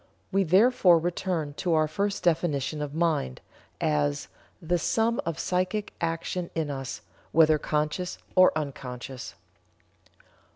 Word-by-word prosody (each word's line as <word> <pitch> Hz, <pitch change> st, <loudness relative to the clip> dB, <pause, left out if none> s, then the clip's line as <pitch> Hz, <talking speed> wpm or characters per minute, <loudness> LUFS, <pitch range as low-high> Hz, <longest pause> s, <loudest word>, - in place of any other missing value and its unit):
We 195 Hz, 0 st, +3 dB
therefore 190 Hz, 0 st, +5 dB
return 170 Hz, -2 st, -2 dB
to 175 Hz, -3 st, +1 dB
our 155 Hz, 0 st, +3 dB
first 200 Hz, +6 st, -2 dB
definition 155 Hz, -4 st, 0 dB
of 145 Hz, 0 st, -4 dB
Mind, 160 Hz, -, 0 dB, 0.4 s
as 75 Hz, -1 st, 0 dB, 0.3 s
'the 175 Hz, +2 st, 0 dB
sum 225 Hz, +7 st, +1 dB
of 165 Hz, -2 st, -2 dB
psychic 185 Hz, +4 st, -1 dB
action 170 Hz, +1 st, -2 dB
in 155 Hz, -3 st, -1 dB
us, 135 Hz, -2 st, -5 dB, 0.3 s
whether 155 Hz, -1 st, +5 dB
conscious 155 Hz, +5 st, -2 dB, 0.2 s
or 185 Hz, 0 st, +6 dB
unconscious.'" 130 Hz, -3 st, -6 dB
165 Hz, 120 wpm, -27 LUFS, 145-180 Hz, 0.4 s, or